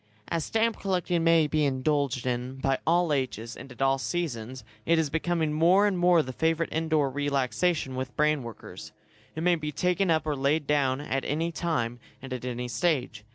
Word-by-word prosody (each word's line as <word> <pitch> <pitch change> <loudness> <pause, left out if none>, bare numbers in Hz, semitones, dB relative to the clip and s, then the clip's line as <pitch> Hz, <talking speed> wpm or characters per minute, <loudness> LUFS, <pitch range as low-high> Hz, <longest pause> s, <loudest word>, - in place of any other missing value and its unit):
As 165 -2 -1
stamp 225 +3 0
collecting 180 -3 0
may 165 -1 +5
be 150 +1 0
indulged 140 -1 0
in 125 +1 -2
by 135 0 0
all 170 -1 +3
ages, 120 -4 -3
and 135 - -11
at 125 +2 -3
all 135 0 +2
seasons, 130 -7 -3 0.2
it 165 0 +3
is 155 -3 0
becoming 160 -1 0
more 175 +6 +4
and 205 -2 +1
more 175 -2 +4
the 130 - -7
favourite 165 +3 0
indoor 160 -2 +1
relaxation 145 +2 0
with 130 -1 -5
brain 150 -1 +2
workers. 115 -3 -10 0.4
It 160 - -3
may 180 0 +4
be 155 -3 -2
taken 180 +4 0
up 160 -2 +2
or 150 -1 -1
laid 140 +3 +1
down 140 -2 +1
at 135 -2 -2
any 165 +3 -1
time, 135 -9 -2 0.2
and 135 0 -7
at 125 -1 -5
any 125 0 -3
stage. 125 -3 -1
150 Hz, 190 wpm, -27 LUFS, 130-165 Hz, 0.4 s, may